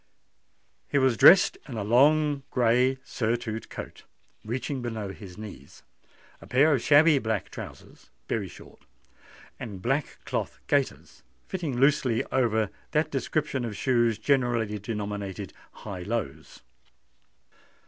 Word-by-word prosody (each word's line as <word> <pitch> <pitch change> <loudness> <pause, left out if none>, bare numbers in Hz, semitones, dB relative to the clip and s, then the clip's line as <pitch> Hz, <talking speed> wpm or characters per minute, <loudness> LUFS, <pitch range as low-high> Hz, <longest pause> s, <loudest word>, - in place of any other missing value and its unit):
He - - 0
was 130 -3 +3
dressed 180 +10 +7
in 125 -5 -6
a 105 - -2
long 145 +6 +4
grey 125 +2 +2
surtout 115 -1 -3
coat, - - -8 0.4
reaching 125 +4 -3
below 110 -4 -4
his 95 -4 -11
knees; 100 -11 -11 0.6
a - - -12
pair 145 +5 +4
of 130 - +1
shabby 150 +1 +5
black 110 -4 -2
trousers, - - -11 0.2
very - - -2
short; - - -14 0.8
and 105 -6 -7
black 135 +8 -1
cloth - - -3
gaiters - - -1 0.3
fitting 160 -9 -3
loosely 135 -3 +3
over 110 -5 +1 0.2
that 155 +1 +1
description 140 -1 -1
of 110 -3 -4
shoes 120 -4 +2
generally 120 -6 +1
denominated 100 -2 -5 0.2
high 100 -4 -8
lows. 90 -8 -5
120 Hz, 120 wpm, -27 LUFS, 105-135 Hz, 0.8 s, dressed